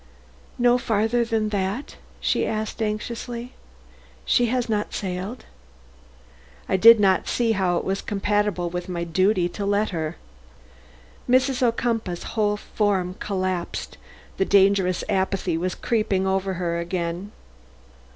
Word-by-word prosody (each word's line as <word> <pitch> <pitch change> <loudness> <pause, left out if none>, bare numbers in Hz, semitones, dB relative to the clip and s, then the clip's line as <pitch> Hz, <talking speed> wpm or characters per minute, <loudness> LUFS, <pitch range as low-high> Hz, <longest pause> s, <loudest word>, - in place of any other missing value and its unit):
"No 245 0 +4
farther 225 +1 +1
than 225 -2 0
that?" 205 +6 -3 0.2
she - - +1
asked 215 +1 -3
anxiously. 235 +3 -4 0.7
"She 245 - +3
has 245 +1 0
not 210 -2 -2
sailed?" 190 +5 -4 1.2
"I - - +1
did 225 +4 +8
not 190 -2 +3
see 235 -2 +1
how 185 -4 +1
it - - -2
was 195 +1 -2
compatible 205 -2 0
with 180 +1 -4
my 170 -1 -2
duty 185 +2 +2
to 175 +4 -5
let 205 +2 +1
her." 160 -1 -3 1.1
Mrs. 255 +1 +3
Ocumpaugh's 230 -6 0
whole 210 -2 +1
form 195 -4 -1
collapsed; 185 -3 -3 0.4
the - - +3
dangerous 195 -2 +3
apathy 190 -3 0
was 180 +2 -2
creeping 215 -5 0
over 190 0 0
her 170 -1 -2
again. 175 +2 -3
200 Hz, 125 wpm, -24 LUFS, 185-225 Hz, 1.2 s, did